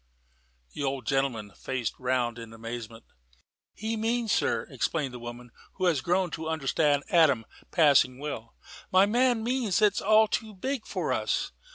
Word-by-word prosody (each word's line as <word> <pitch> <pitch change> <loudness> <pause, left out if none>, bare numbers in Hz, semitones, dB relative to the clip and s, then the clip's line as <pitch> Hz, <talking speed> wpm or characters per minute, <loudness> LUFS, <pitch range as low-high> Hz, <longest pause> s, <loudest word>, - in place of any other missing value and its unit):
The - - -6
old 135 -2 -2
gentleman 135 -7 -1
faced 125 +1 -3
round 125 -2 0
in 115 -1 -9
amazement. 115 0 -7 0.7
"He 220 +2 -3
means, 225 0 0
sir," 115 -9 +1
explained 135 +1 -1
the 125 - -7
woman, 120 0 -9 0.2
who 185 - -2
had 165 -7 +2
grown 180 0 +1
to 160 +1 -4
understand 145 -1 +1
Adam 140 -9 +4 0.2
passing 140 -6 +4
well, 130 -6 -6 0.4
"my 185 +1 +6
man 240 +1 +2
means 240 -5 0
that 215 - +5
it's 205 -1 +1
all 215 +1 +5
too 215 0 -3
big 260 +5 -3
for - - -1
us. - - -1
145 Hz, 160 wpm, -28 LUFS, 125-205 Hz, 0.7 s, my